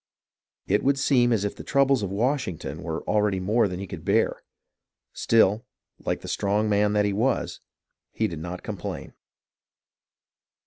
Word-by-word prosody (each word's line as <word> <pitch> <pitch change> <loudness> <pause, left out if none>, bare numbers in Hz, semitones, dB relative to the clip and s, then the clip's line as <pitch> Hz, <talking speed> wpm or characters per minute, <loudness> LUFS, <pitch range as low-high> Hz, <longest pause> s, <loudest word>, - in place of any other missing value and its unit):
It 105 +2 +1
would 140 +1 +3
seem 125 -3 +3
as 105 -3 +1
if 100 - -3
the - - -9
troubles 140 -3 +3
of 100 - -2
Washington 115 - -2
were 80 -3 -4
already 105 -2 +1
more 105 +4 +2
than 90 -1 -5
he 100 - -4
could 90 - -8
bear. - - +1 0.7
Still, 110 -1 +3 0.4
like - - -2
the - - -9
strong 105 +1 0
man 105 0 +2
that 105 -1 +3
he 100 - 0
was, 120 +5 0 0.5
he - - 0
did 85 - -6
not 90 +3 -6
complain. - - -6
105 Hz, 160 wpm, -25 LUFS, 95-120 Hz, 0.7 s, would